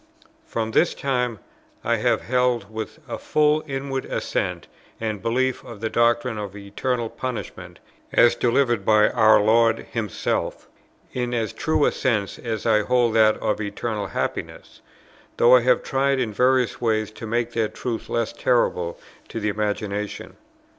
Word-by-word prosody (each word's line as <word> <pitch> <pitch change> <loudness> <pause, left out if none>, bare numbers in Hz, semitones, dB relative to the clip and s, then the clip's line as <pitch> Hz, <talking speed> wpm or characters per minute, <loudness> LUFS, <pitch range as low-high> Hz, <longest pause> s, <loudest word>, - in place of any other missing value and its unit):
From 110 - -2
this 165 - +2
time 125 -4 -1 0.5
I - - +1
have - - +1
held 120 -4 0
with 110 -1 -5
a - - -5
full 150 0 +2
inward 135 -1 -3
assent - - -2 0.3
and 110 -3 -3
belief 130 +3 0
the 110 -1 -5
doctrine 120 -1 +2
of 100 -1 -6
eternal 115 +4 -2
punishment, 120 -3 -6 0.3
as 120 - +5
delivered 120 -3 +1
by 105 +1 +4
our 110 -3 +5
Lord 115 +2 +3
Himself, 110 -4 -2 0.5
in 125 -1 -2
as 110 -3 -2
true 155 -2 +1
a - - +3
sense 105 -6 -1
as 110 -3 -4
I 110 -2 +4
hold 120 0 +2
that 110 -1 +4
of 105 - 0
eternal 105 0 -3
happiness; - - -5 0.6
though 120 +2 +7
I 125 - +5
have 125 +2 +2
tried 135 0 +1
in 115 -4 -1
various 125 -1 +2
ways 110 -2 0
to 110 +1 -8
make 120 +1 -1
that 110 -2 -1
truth 115 -3 -4
less 115 -1 -1
terrible 90 -8 0 0.3
to 115 - -5
the 105 -1 -1
imagination. 105 0 -3
115 Hz, 150 wpm, -23 LUFS, 110-125 Hz, 0.6 s, though